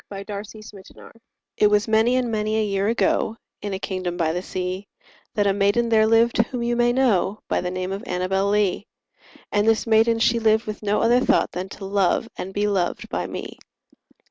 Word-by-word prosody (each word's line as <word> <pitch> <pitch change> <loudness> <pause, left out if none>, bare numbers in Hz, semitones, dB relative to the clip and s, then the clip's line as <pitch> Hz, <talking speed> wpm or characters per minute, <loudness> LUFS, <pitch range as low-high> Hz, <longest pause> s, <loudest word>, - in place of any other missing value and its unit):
1846 205 +2 -8 0.2
Note - - -14
Annabel - - -14
Lee 230 - -24 0.4
It - - +8
was 210 0 +2
many 225 +3 +3
and 250 -2 0
many 215 0 -1
a 220 - +1
year 195 -1 -1
ago, 225 0 +1 0.2
In 205 - -4
a 190 - -2
kingdom 185 -2 -4
by 160 -2 0
the 180 - -2
sea, 185 +2 -4 0.5
That 205 - +2
a 200 - +3
maiden 205 +4 +1
there 220 -1 +4
lived 230 +1 +3
whom 235 +1 0
you 240 0 0
may 240 0 +3
know 215 -6 +1
By - - 0
the 180 - -3
name 185 +1 -4
of 195 +3 -5
Annabel 190 +2 0
Lee; 205 0 0 0.6
And 205 +1 +1
this 225 -1 +2
maiden 225 0 +3
she 230 +1 +2
lived 220 0 +2
with 215 -1 -6
no 210 0 0
other 240 +2 +4
thought - - +2
Than 180 +2 -5
to 195 - -9
love 195 +2 +1
and 190 - -6
be 205 +1 -1
loved 190 -4 -1
by - - -3
me. - - -7
210 Hz, 210 wpm, -23 LUFS, 195-225 Hz, 0.6 s, It